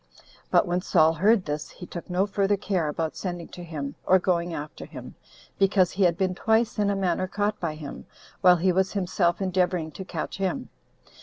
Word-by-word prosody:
But -, -, +4 dB
when 175 Hz, +1 st, 0 dB
Saul 160 Hz, -3 st, +4 dB
heard 195 Hz, +4 st, +3 dB
this, 150 Hz, 0 st, -3 dB
he 180 Hz, -, -10 dB
took 175 Hz, 0 st, -8 dB
no 180 Hz, +2 st, +2 dB
further 200 Hz, 0 st, +1 dB
care 185 Hz, -5 st, -1 dB
about 155 Hz, +1 st, -2 dB
sending 175 Hz, -3 st, -5 dB
to 175 Hz, -, -9 dB
him, 150 Hz, -5 st, -5 dB
or 185 Hz, -, +5 dB
going 175 Hz, -1 st, 0 dB
after 150 Hz, -2 st, -6 dB
him, -, -, -9 dB, 0.5 s
because 195 Hz, -2 st, +4 dB
he 200 Hz, -, -4 dB
had 175 Hz, -3 st, +4 dB
been 185 Hz, -1 st, +1 dB
twice, 220 Hz, +3 st, +1 dB
in 205 Hz, -1 st, +2 dB
a 200 Hz, -, +1 dB
manner, 185 Hz, -1 st, 0 dB
caught 205 Hz, +2 st, -1 dB
by 160 Hz, -3 st, -2 dB
him, 150 Hz, -2 st, -8 dB, 0.3 s
while 180 Hz, -1 st, +7 dB
he 185 Hz, +2 st, +2 dB
was 190 Hz, +1 st, +1 dB
himself 180 Hz, -3 st, +1 dB
endeavoring 180 Hz, -3 st, 0 dB
to 190 Hz, -, -7 dB
catch 170 Hz, -4 st, -5 dB
him. 195 Hz, +7 st, -2 dB
180 Hz, 200 wpm, -26 LUFS, 170-195 Hz, 0.5 s, while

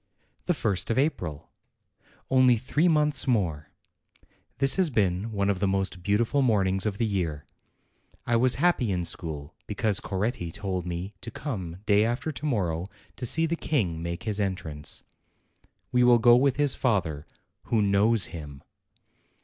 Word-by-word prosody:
THE 175 Hz, -, +2 dB
first 100 Hz, -9 st, -1 dB
of 115 Hz, -, 0 dB
April! 95 Hz, -, -2 dB, 0.8 s
Only 130 Hz, -2 st, +5 dB
three 145 Hz, +8 st, +1 dB
months 150 Hz, -4 st, +2 dB
more! 85 Hz, -, 0 dB, 0.9 s
This 135 Hz, -1 st, +2 dB
has 185 Hz, -4 st, +3 dB
been 105 Hz, -3 st, 0 dB
one 100 Hz, -2 st, 0 dB
of 100 Hz, -2 st, 0 dB
the 100 Hz, -, +1 dB
most 95 Hz, -2 st, -1 dB
beautiful 110 Hz, +9 st, +1 dB
mornings 95 Hz, -5 st, +2 dB
of 100 Hz, -2 st, -3 dB
the 115 Hz, -, +1 dB
year. 85 Hz, -8 st, -2 dB, 0.8 s
I 120 Hz, -, +1 dB
was 125 Hz, +2 st, +4 dB
happy 170 Hz, -10 st, +2 dB
in 90 Hz, -2 st, -1 dB
school 80 Hz, -3 st, -5 dB
because 105 Hz, -1 st, 0 dB
Coretti 95 Hz, -3 st, -3 dB
told 95 Hz, -2 st, -4 dB
me 90 Hz, +4 st, -4 dB
to 115 Hz, -, -6 dB
come 95 Hz, -, -6 dB
day 105 Hz, 0 st, +4 dB
after 120 Hz, +7 st, -1 dB
to 150 Hz, +1 st, -7 dB
morrow 90 Hz, -, -1 dB, 0.3 s
to 125 Hz, -, -2 dB
see 165 Hz, +7 st, +4 dB
the 165 Hz, +1 st, -1 dB
King 100 Hz, -, -1 dB
make 85 Hz, +4 st, -4 dB
his 105 Hz, -2 st, -2 dB
entrance. 90 Hz, -7 st, -2 dB, 0.9 s
We 125 Hz, 0 st, +3 dB
will 120 Hz, -1 st, +6 dB
go 120 Hz, +1 st, +6 dB
with 135 Hz, +1 st, +3 dB
his 145 Hz, -2 st, +2 dB
father, 85 Hz, -, -1 dB, 0.4 s
who 115 Hz, -, +1 dB
knows 100 Hz, +2 st, +3 dB
him. 75 Hz, -4 st, -9 dB
105 Hz, 155 wpm, -27 LUFS, 90-125 Hz, 0.9 s, will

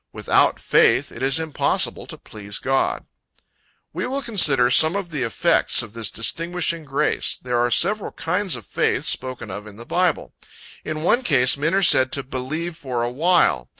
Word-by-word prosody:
"Without -, -, +1 dB
faith -, -, +2 dB
it -, -, -11 dB
is 135 Hz, +3 st, +2 dB
impossible 160 Hz, -3 st, -1 dB
to -, -, -8 dB
please 105 Hz, -1 st, -8 dB
God." 135 Hz, 0 st, -1 dB, 0.9 s
We -, -, -3 dB
will 275 Hz, +2 st, -3 dB
consider 145 Hz, -, +4 dB
some 160 Hz, +7 st, +4 dB
of 195 Hz, -4 st, -4 dB
the 150 Hz, -3 st, -4 dB
effects 115 Hz, -1 st, +1 dB
of 110 Hz, -2 st, -12 dB
this 115 Hz, -3 st, -2 dB
distinguishing 165 Hz, +6 st, -2 dB
grace. 140 Hz, +2 st, -1 dB
There 125 Hz, -1 st, -3 dB
are 120 Hz, 0 st, +1 dB
several 200 Hz, -, +1 dB
kinds 180 Hz, +1 st, -1 dB
of 115 Hz, -5 st, -10 dB
faith -, -, -1 dB
spoken 130 Hz, -5 st, -2 dB
of 105 Hz, +3 st, -8 dB
in 105 Hz, -, -12 dB
the 115 Hz, +2 st, -12 dB
Bible. 180 Hz, +1 st, -1 dB, 0.5 s
In 155 Hz, 0 st, -5 dB
one 240 Hz, +8 st, +2 dB
case, 130 Hz, -, +2 dB
men 155 Hz, +5 st, -1 dB
are 195 Hz, -, +1 dB
said 130 Hz, -6 st, +4 dB
to 140 Hz, -, -3 dB
"believe 155 Hz, +7 st, -5 dB
for 130 Hz, -7 st, -4 dB
a 120 Hz, -, -2 dB
while." 155 Hz, -, +2 dB
140 Hz, 180 wpm, -21 LUFS, 120-170 Hz, 0.9 s, consider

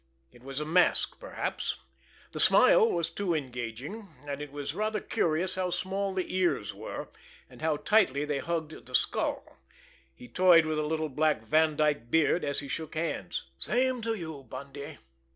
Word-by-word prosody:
It 120 Hz, -, -18 dB
was 135 Hz, +2 st, -5 dB
a 150 Hz, -, -3 dB
mask 175 Hz, +3 st, +2 dB
perhaps! -, -, -3 dB, 0.5 s
The -, -, -6 dB
smile -, -, +7 dB
was 170 Hz, -2 st, -1 dB
too 185 Hz, -5 st, -1 dB
engaging; 130 Hz, -, -5 dB, 0.2 s
and 140 Hz, 0 st, -4 dB
it 150 Hz, -1 st, -7 dB
was 145 Hz, 0 st, -4 dB
rather 215 Hz, +3 st, -1 dB
curious 170 Hz, 0 st, 0 dB
how 185 Hz, -1 st, -1 dB
small 195 Hz, +2 st, -2 dB
the 185 Hz, -1 st, -3 dB
ears 170 Hz, -, +1 dB
were, 105 Hz, +3 st, -7 dB, 0.4 s
and -, -, -16 dB
how 155 Hz, -1 st, +1 dB
tightly 150 Hz, -8 st, +2 dB
they 145 Hz, -2 st, -1 dB
hugged 160 Hz, -3 st, -4 dB
the 125 Hz, -, -3 dB
skull. -, -, -1 dB, 0.6 s
He 125 Hz, -, -12 dB
toyed 170 Hz, +5 st, +5 dB
with 155 Hz, -1 st, -1 dB
a 150 Hz, -, -1 dB
little 160 Hz, 0 st, -1 dB
black 150 Hz, -3 st, +1 dB
Vandyke 150 Hz, -2 st, +2 dB
beard, 160 Hz, +4 st, +3 dB
as 140 Hz, 0 st, -1 dB
he 140 Hz, -, -8 dB
shook 160 Hz, +3 st, -5 dB
hands. 165 Hz, +1 st, -3 dB, 0.2 s
"Same 255 Hz, 0 st, +1 dB
to 225 Hz, 0 st, -1 dB
you, 160 Hz, -7 st, -7 dB
Bundy!" 140 Hz, +1 st, -8 dB
155 Hz, 170 wpm, -29 LUFS, 140-185 Hz, 0.6 s, smile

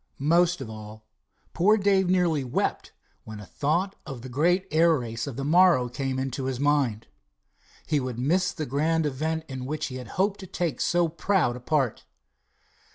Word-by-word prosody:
Most 170 Hz, +3 st, +2 dB
of 130 Hz, -, -5 dB
all, 110 Hz, 0 st, -10 dB, 0.5 s
poor 210 Hz, +5 st, +4 dB
Dave 195 Hz, -2 st, +2 dB
nearly 175 Hz, -6 st, +2 dB
wept 125 Hz, -, -2 dB, 0.3 s
when 110 Hz, -1 st, -9 dB
a 105 Hz, -, -9 dB
thought 170 Hz, -, -1 dB
of 130 Hz, -4 st, -8 dB
the 130 Hz, -, -7 dB
great 175 Hz, +9 st, +2 dB
air 165 Hz, 0 st, +4 dB
race 115 Hz, -1 st, -5 dB
of 135 Hz, -, -5 dB
the 135 Hz, +2 st, -4 dB
morrow 170 Hz, -5 st, +4 dB
came 130 Hz, +1 st, -3 dB
into 130 Hz, 0 st, -3 dB
his 130 Hz, -2 st, -3 dB
mind. 140 Hz, -7 st, +1 dB, 0.8 s
He 150 Hz, -2 st, +1 dB
would 125 Hz, -3 st, -4 dB
miss 180 Hz, +9 st, +1 dB
the 155 Hz, -5 st, -4 dB
grand 155 Hz, +4 st, 0 dB
event 155 Hz, +3 st, -2 dB
in 130 Hz, -2 st, -6 dB
which 155 Hz, +2 st, -3 dB
he 130 Hz, -, -6 dB
had 125 Hz, -2 st, -8 dB
hoped 195 Hz, +2 st, +1 dB
to 190 Hz, -, -9 dB
take 170 Hz, -7 st, -3 dB
so 175 Hz, 0 st, +2 dB
proud 170 Hz, -5 st, 0 dB
a -, -, -7 dB
part. 130 Hz, -2 st, -1 dB
150 Hz, 180 wpm, -26 LUFS, 130-175 Hz, 0.8 s, poor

